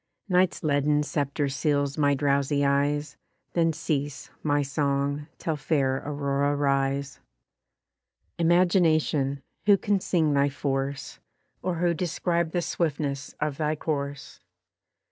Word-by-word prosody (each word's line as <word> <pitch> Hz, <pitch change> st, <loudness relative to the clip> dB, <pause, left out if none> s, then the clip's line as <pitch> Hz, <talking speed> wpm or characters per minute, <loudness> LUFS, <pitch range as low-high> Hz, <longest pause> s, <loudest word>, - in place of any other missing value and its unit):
Night's 185 Hz, -1 st, +2 dB
leaden 150 Hz, 0 st, +2 dB
sceptre 145 Hz, 0 st, -1 dB
seals 140 Hz, +1 st, 0 dB
my 145 Hz, -2 st, +3 dB
drowsy 140 Hz, 0 st, +1 dB
eyes, 145 Hz, +1 st, 0 dB, 0.4 s
Then 165 Hz, -1 st, +3 dB
cease, 145 Hz, -2 st, -3 dB
my 145 Hz, -1 st, +1 dB
song, 140 Hz, 0 st, -1 dB
till 160 Hz, -, -2 dB
fair 135 Hz, -3 st, +1 dB
Aurora 140 Hz, 0 st, 0 dB
rise. 140 Hz, 0 st, 0 dB, 1.2 s
Imagination! 165 Hz, -5 st, +2 dB, 0.2 s
Who 200 Hz, -1 st, +7 dB
can 200 Hz, +1 st, +1 dB
sing 160 Hz, -5 st, +1 dB
thy 140 Hz, 0 st, +3 dB
force? 135 Hz, 0 st, -3 dB, 0.4 s
Or 180 Hz, -2 st, -1 dB
who 170 Hz, +1 st, +1 dB
describe 170 Hz, 0 st, -1 dB
the 175 Hz, +1 st, -1 dB
swiftness 145 Hz, -5 st, -2 dB
of 150 Hz, -2 st, -1 dB
thy 155 Hz, -1 st, 0 dB
course? 145 Hz, -2 st, -4 dB
145 Hz, 115 wpm, -26 LUFS, 140-160 Hz, 1.2 s, Who